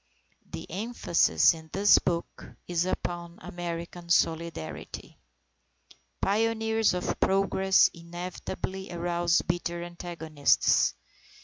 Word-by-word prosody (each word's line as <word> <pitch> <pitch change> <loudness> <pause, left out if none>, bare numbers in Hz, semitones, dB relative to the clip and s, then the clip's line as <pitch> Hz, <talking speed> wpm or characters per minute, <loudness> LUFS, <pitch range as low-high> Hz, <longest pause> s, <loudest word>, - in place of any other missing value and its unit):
The - - -7
emphasis 205 -4 +2
in 160 -1 -12
this 200 +1 +5
book 170 -1 -3 0.2
is 175 0 0
upon 175 -2 -4
American 170 0 -6
Solidarity. 165 - -2 1.0
Pioneers 220 0 +1
of 180 - -2
progress 190 0 +4
inevitably 180 +2 -6
arouse 175 0 +1
bitter 175 0 -2
antagonists. 170 -4 +1
175 Hz, 85 wpm, -28 LUFS, 170-190 Hz, 1.0 s, this